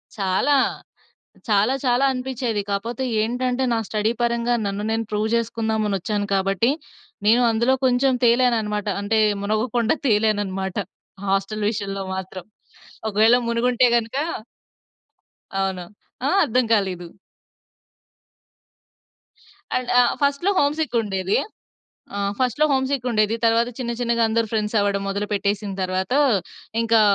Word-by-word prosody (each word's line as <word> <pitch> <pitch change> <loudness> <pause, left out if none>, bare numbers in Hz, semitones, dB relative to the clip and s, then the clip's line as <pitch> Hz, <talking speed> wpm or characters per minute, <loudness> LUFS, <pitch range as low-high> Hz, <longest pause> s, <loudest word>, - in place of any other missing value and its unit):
చాలా. 195 +8 +1 1.0
చాలా, 210 +5 +3
చాలా 250 +2 +3
అనిపిచ్చేది. 250 -4 -2
కాపోతే 230 +6 -2 0.2
ఏంటంటే, 250 +3 -1
నా 230 - +1
స్టడీ 215 +1 0
పరంగా 235 0 +1
నన్ను 200 +1 -3
నేను 225 0 0
ప్రూవ్ 210 +1 0
చేసుకుందామనొచ్చాను. 215 -3 -1
కాబట్టి, 195 +5 +1 0.6
నేను 235 +3 +5
అందులో 235 +4 +2
కొంచెం 255 +1 +3
తేలాననమాట. 230 -4 +2
అంటే, 220 +2 +1 0.2
మునగకుండా 220 +3 0
తేలాననమాట. 205 -4 0 0.5
హాస్టల్ 195 +2 -1
విషయంలో 195 -2 -4
మాత్రం. 190 -1 -7 0.6
ఒకవేళ 220 +3 +4
మునిగుంటే 245 +1 +2
గనక 230 +2 -2 1.4
అవును. 190 -2 -2 0.4
ఆ! - - +2
అర్థం 250 +1 +1
కాలేదు. 185 -5 0 2.7
అండ్ 255 -1 -2
ఆహ్, 245 - +4
ఫస్ట్‌లో 285 +7 +2
హోమ్‌సిక్ 300 -1 +1
ఉండేది. 195 -2 -1 0.8
ఆహ్, 200 0 -1
ఫస్ట్‌లో 255 +4 +1
హోమ్‌సిక్ 265 -1 0
ఉండేది. 215 -1 +2
తర్వాత 230 +1 +3
చిన్న, 240 -2 -3
చిన్నగా 235 -1 +1
అందరూ 230 0 +1
ఫ్రెండ్సవ్వడం 210 -2 0
మొదలు 200 +1 -2
పెట్టేసిన 200 0 -1
తర్వాత, 185 +3 -2 0.7
ఇంకా 230 -1 +4
220 Hz, 110 wpm, -22 LUFS, 200-245 Hz, 2.7 s, నేను